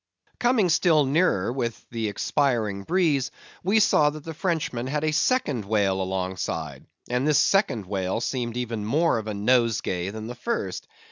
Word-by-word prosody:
Coming 240 -6 +3
still 165 -3 +4
nearer 135 - +1
with 120 -3 -3
the 115 -2 -2
expiring 110 -3 0
breeze, 160 -7 +1 0.3
we 200 +5 +3
saw 150 -7 +4
that 150 0 -8
the 160 - -6
Frenchman 155 -8 -2
had 150 +3 -2
a 155 - +1
second 150 - +1
whale 100 -2 +1
alongside; 95 0 -4 0.2
and 125 +3 0
this 150 - +4
second 195 - +2
whale 95 +1 -2
seemed 120 -1 -3
even 115 -3 -3
more 145 +4 +2
of 110 - -7
a 105 - -3
nosegay 105 -5 +1
than 110 +1 -7
the 120 - -5
first. 230 - -3
125 Hz, 160 wpm, -25 LUFS, 105-155 Hz, 0.3 s, still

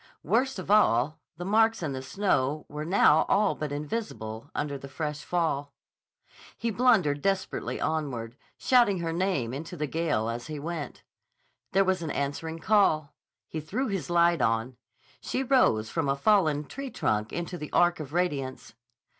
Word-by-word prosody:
Worst 260 +2 +1
of 185 +1 -4
all, 155 - +4 0.2
the 175 - -5
marks 220 0 +3
in 145 -3 -2
the 130 - -4
snow 150 -2 0
were 150 +1 -6
now 160 -3 +5
all 205 0 +3
but 150 -2 -5
invisible 145 - -5
under 145 -1 -2
the 140 0 -8
fresh 150 +1 -4
fall. 150 -5 -1 0.8
He 230 0 -1
blundered 190 - +3
desperately 195 +2 -1
onward, 130 -7 -2 0.2
shouting 240 -7 +4
her 165 -1 -2
name 170 -10 -1
into 160 +6 -6
the 150 - -1
gale 150 -7 -1
as 115 +1 -4
he 155 -1 -5
went. 155 -2 -5 0.7
There 195 +1 +4
was 185 -1 +1
an 165 - -3
answering 145 +4 -3
call. 165 -5 +2 0.3
He 160 - -5
threw 225 - -2
his 195 -3 -3
light 170 0 +3
on. 115 +3 0 0.4
She 265 - -2
rose 175 - +3
from 160 -4 -1
a 135 - +2
fallen 155 -3 +3
tree 275 - -6
trunk 105 - -1
into 175 +1 -4
the 150 -4 -7
arc 175 0 +3
of 145 -3 -7
radiance. 145 -9 -2
160 Hz, 165 wpm, -28 LUFS, 140-190 Hz, 0.8 s, now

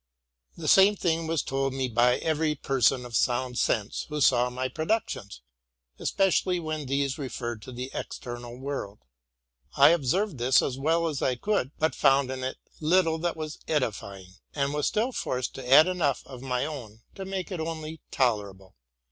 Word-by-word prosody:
The - - -5
same 195 +2 +6
thing 165 -3 0
was 160 -3 0
told 135 0 -1
me 135 -1 0
by 120 +1 +3
every 155 -1 0
person 135 -2 +1
of 120 -2 -7
sound 125 +1 +1
sense 105 -1 0
who 150 0 -3
saw 125 -3 +4
my 130 +1 -2
productions, 155 - -3 0.6
especially 185 -2 +1
when 155 -3 -4
these 140 +1 -1
referred 120 -5 -4
to 130 - -9
the 125 +2 -6
external 120 0 -6
world. 130 -7 -5 0.8
I 140 +1 +8
observed 170 - +1
this 125 +2 +4
as 130 - -2
well 165 +4 +2
as 150 -4 -3
I 130 - +1
could, 200 -2 0
but 160 +1 +1
found 135 -1 +3
in 130 0 -5
it 130 - -3 0.2
little 160 0 +2
that 170 0 -2
was 155 -1 -6
edifying, 100 -10 -3 0.2
and 140 -1 0
was 150 -1 0
still 230 +5 0
forced 125 - -3
to 130 -2 -8
add 150 +3 +9
enough 175 -7 0
of 130 -3 -10
my 125 0 -1
own 120 -8 -8
to 195 - -7
make 190 0 -4
it 180 - -4
only 160 -1 -5
tolerable. 100 -7 -1
135 Hz, 175 wpm, -27 LUFS, 125-160 Hz, 0.8 s, add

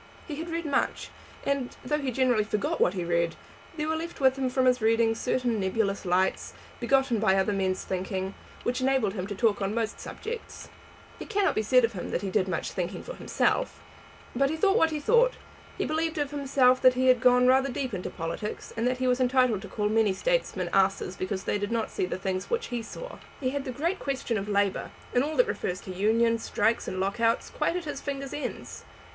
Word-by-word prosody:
He 295 -3 -5
had 330 +2 -5
read 335 0 -3
much, 290 - -1 0.4
and, 280 -3 -1
though 300 +3 0
he 275 -3 -2
generally 250 -3 +2
forgot 210 -1 -1
what 180 - +3
he 180 -2 -2
read, 170 -1 +1 0.4
there 300 0 -1
were 315 - 0
left 335 +2 -5
with 265 -1 +4
him 265 -1 -1
from 260 0 +1
his 250 -1 +3
readings 225 0 +3
certain 245 -3 0
nebulous 200 +1 -1
lights, 185 +2 +1 0.3
begotten 250 -1 +2
by 205 -3 +3
other 195 +2 +2
men's 190 -1 0
thinking, 190 +1 -3 0.3
which 250 +1 -1
enabled 260 -6 +2
him 190 -2 -4
to 205 - -5
talk 210 -1 +2
on 195 +2 -1
most 225 -1 -2
subjects. 465 +1 -7 0.5
It - - -8
cannot 405 -2 +2
be - - +1
said 250 +3 +4
of 230 - -5
him 180 - -5
that - - -2
he 195 - -2
did 185 - +1
much 175 -3 -2
thinking 180 +1 -4
for - - -7
himself; - - 0 0.6
but 275 +2 +3
he 320 - -2
thought 395 +6 +3
that 325 - +4
he 310 -1 -3
thought. 480 +10 +4 0.4
He - - -1
believed 320 +1 -1
of 290 -1 -1
himself 265 -3 +3
that 255 -1 +6
he 260 +1 +1
had 255 -2 +5
gone 250 0 +5
rather 265 +2 +4
deep 260 -2 -3
into 185 -2 -3
politics, 165 +5 -5
and 230 +2 0
that 255 0 0
he 255 - -1
was 250 0 +2
entitled 255 -5 +3
to - - -8
call 210 -1 -1
many 215 -2 +3
statesmen 190 - -1
asses 195 -1 +2
because 190 0 -3
they 205 - -1
did 205 +1 -3
not 230 -1 -1
see 180 - -1
the 180 - -3
things 190 -1 -3
which 470 0 -1
he 240 -1 -2
saw. - - -8 0.2
He 255 -2 -1
had 280 0 -3
the 260 - -3
great 335 +9 -1
question 260 -5 -2
of 200 +2 -5
labour, 200 -1 +1 0.2
and 245 - +3
all 310 +2 -3
that - - +5
refers 180 +1 -2
to 190 - -8
unions, 230 +4 +2
strikes, 220 +3 +1
and 185 - -3
lock 195 +4 -1
outs, 230 0 +1
quite - - 0
at 360 -2 -3
his 285 -2 -5
fingers' 275 -1 -4
ends. 295 - -6
240 Hz, 225 wpm, -27 LUFS, 200-275 Hz, 0.6 s, that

